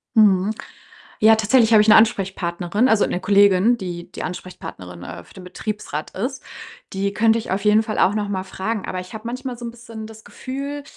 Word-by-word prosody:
Mhm. 205 -2 +4 0.7
Ja, 220 +1 +6
tatsächlich 225 +1 +3
habe 215 -1 +7
ich 215 - -1
'ne 215 - +8
Ansprechpartnerin, 195 -1 +1
also 220 -3 +3
'ne 180 - -3
Kollegin, 200 +3 +4
die 175 -5 -7
die - - -7
Ansprechpartnerin, 95 - -8
äh, 85 - -9
für - - -20
den 185 - -11
Betriebsrat 180 -4 -5
ist. 255 +8 -4 0.5
Die 195 +1 -1
könnte 225 +2 +3
ich 225 - -6
auf 195 +2 -2
jeden 210 +1 +5
Fall 220 -1 -4
auch 200 - +3
noch 210 -1 -2
mal 190 -2 -2
fragen, 190 +2 -4
aber 185 - -4
ich 180 0 -11
habe 220 0 -8
manchmal 255 +1 -5
so 240 - -9
'n 235 - -4
bisschen 230 -2 -10
das 220 0 -13
Gefühl, 280 +2 -6
210 Hz, 200 wpm, -21 LUFS, 185-225 Hz, 0.7 s, ne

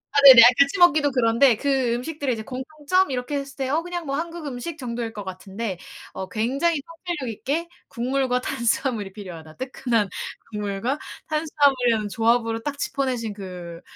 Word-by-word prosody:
아 - - +6
네네 255 -4 +12 0.2
같이 280 +6 +4
먹기도 310 -5 +5
그런데 240 0 +4
그 265 -4 +1
음식들의 280 +1 -2
이제 220 - -6
공통점 300 - -1
이렇게 255 +2 -3
했을 275 0 -8
때 265 -1 -2
어 305 +4 +1
그냥 350 0 -5
뭐 275 -1 -2
한국 335 +1 -4
음식 285 +4 -5
정도일 235 -4 -4
것 210 -2 -7
같은데 190 +1 -6 0.3
어 190 0 -6
굉장히 275 - 0
통찰력 330 -7 -5
있게 295 +10 -2 0.2
국물과 250 +1 -1
탄수화물이 235 -5 -1
필요하다. 170 -6 -10
뜨끈한 245 -5 -1 0.4
국물과 210 +6 -2 0.3
탄수화물이라는 275 -8 +2
조합으로 230 +1 +1
딱 285 +3 -4
짚어내신 255 -6 -2
그 180 -4 -8
255 Hz, 370 characters per minute, -24 LUFS, 225-285 Hz, 0.4 s, 네네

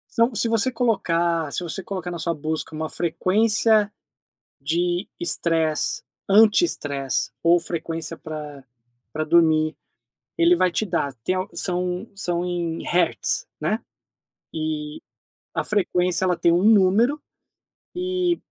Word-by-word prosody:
São 230 +1 +3
se 230 - +2
você 225 +3 +1
colocar 170 - 0
se - - -1
você 175 +3 -4
colocar 185 -3 -5
na 170 - -5
sua 165 +1 -1
busca 155 +1 -4
uma 155 0 -3
frequência 210 +5 +2 0.7
de 175 +6 0
estresse, 165 -2 0 0.3
antiestresse 195 - +2
ou 170 +1 +5
frequência 165 -1 -4
pra 150 -3 -8 0.5
pra 155 0 -2
dormir, 155 -2 +3 0.6
ele 170 +1 +5
vai 185 0 +2
te 215 - -1
dar. 170 -6 -1
Tem 185 - +1
al 185 +2 -2
são 180 +1 -2
são 175 -3 -2
em 170 -2 -3
hertz, 170 - 0
né. - - 0 0.7
E 155 -1 -4 0.5
a - - 0
frequência, 180 -3 +1
ela 180 -1 +2
tem 170 - +3
um 175 +3 +2
número, 220 +7 +4 0.8
e 360 -1 0
175 Hz, 125 wpm, -23 LUFS, 160-200 Hz, 0.8 s, ou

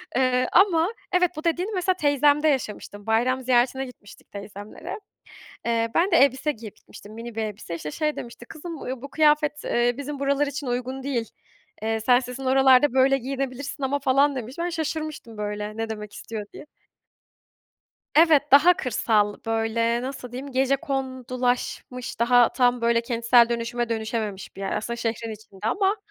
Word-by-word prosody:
Eee, 255 -1 +2
ama 360 0 +4 0.2
evet 360 -2 +3
bu 310 - -5
dediğini 350 +5 0
mesela 370 0 +2
teyzemde 290 -1 +3
yaşamıştım. 210 -6 -2
Bayram 245 +4 +1
ziyaretine 255 +1 +2
gitmiştik 235 -5 -15
teyzemlere. 205 - -8 0.7
Eee, 230 -1 0
ben 360 +4 +3
de 335 - +4
elbise 275 +1 +3
giyip 220 -5 -11
gitmiştim. 205 +1 -14
Mini 230 +1 -8
bir 225 - -2
elbise. 210 -5 -5
İşte 155 -2 -5
şey 300 - -1
demişti: 240 0 -9
"Kızım, 320 +1 -8
eee, 255 -1 -5
bu 280 - -8
kıyafet, 300 0 +2
eee, 240 0 +1
bizim 285 0 -5
buralar 280 +1 +1
için 285 0 -5
uygun 255 +2 -3
değil. 245 -5 -2 0.5
Eee, 225 0 -1
sen 245 +3 +4
sizin 250 +1 -7
oralarda 265 0 +5
böyle 265 +1 +4
giyinebilirsin 270 +2 -4
ama." 275 +2 0
falan 280 +1 +2
demiş. 250 +1 -6
Ben 345 +1 -1
şaşırmıştım 310 -7 -4
böyle 210 0 -4
ne 225 0 -3
demek 210 -1 -6
istiyor 215 -1 -7
diye. - - -11 1.5
Evet 315 -2 +6
daha 310 +6 +8
kırsal 215 -4 +1
böyle, 225 +1 0
nasıl 255 -2 -6
diyeyim, 270 +3 -7
gecekondulaşmış, 260 -2 -2
daha 240 0 +5
tam 245 -1 +2
böyle 235 0 +3
kentsel 235 0 +4
dönüşüme 235 0 -2
dönüşememiş 220 -4 -4
bir - - -8
yer 195 - -2
aslında 235 +2 -3
şehrin 230 -1 -3
içinde 210 -2 -14
ama, 390 - +1
255 Hz, 160 wpm, -24 LUFS, 230-285 Hz, 1.5 s, daha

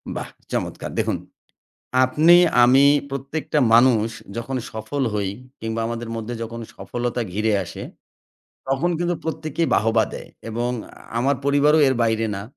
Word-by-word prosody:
বাহ! - - -5 0.2
চমৎকার - - -3
দেখুন - - 0 0.9
আপনি 155 +6 +5 0.3
আমি 130 +3 +6 0.3
প্রত্যেকটা 140 +3 -2 0.2
মানুষ 115 -2 +5 0.3
যখন 115 +3 -3 0.2
সফল 110 +6 -3
হই 100 -2 -1 0.3
কিংবা 110 0 -3
আমাদের 115 0 -4
মধ্যে 115 +2 -5
যখন 115 +1 -6 0.2
সফলতা 120 0 -3
ঘিরে 110 +3 0
আসে 85 - -8 0.9
তখন 135 +6 +1
কিন্তু 175 0 0
প্রত্যেকেই 160 0 -2
বাহবা 110 +1 +3
দেয় - - -8 0.2
এবং 120 +2 -2 0.5
আমার 135 +3 +2
পরিবারও 145 +2 +4
এর 130 - +2
বাইরে 115 -1 +1
না। 100 - -5
120 Hz, 135 wpm, -22 LUFS, 115-140 Hz, 0.9 s, আমি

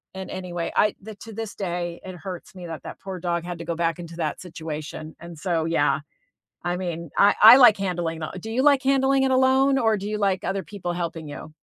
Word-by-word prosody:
And 190 -1 -6
any 180 -2 -6
way, 170 -1 -2
I 210 - +3 0.3
to 225 - -9
this 220 0 -6
day, 175 -2 -3
it 185 -1 -7
hurts 185 +1 -8
me 180 -2 -8
that 160 -1 -7
that - - -9
poor 190 -2 -6
dog 170 -1 -1
had 175 -1 -5
to 170 - -6
go 170 - -2
back 165 -1 0
into 170 -1 -8
that 155 -3 -2
situation, 155 -2 -7
and 170 -1 -10
so, 165 -3 0
yeah, 155 -3 +2 0.7
I 175 0 0
mean, 170 -2 -4
I 205 +1 +6
I 225 +4 +12
like 240 -5 +8
handling 175 -4 -2
that 175 +4 -6
do 220 - -6
you 250 +4 +1
like 285 -2 +5
handling 270 0 +3
it 265 - +1
alone 265 +1 +4
or 220 -3 +2
do 200 - -6
you 210 0 -2
like 195 -3 0
other 195 0 -1
people 180 -3 -5
helping 170 -2 -4
you? 155 +1 -9
180 Hz, 230 wpm, -24 LUFS, 170-215 Hz, 0.7 s, I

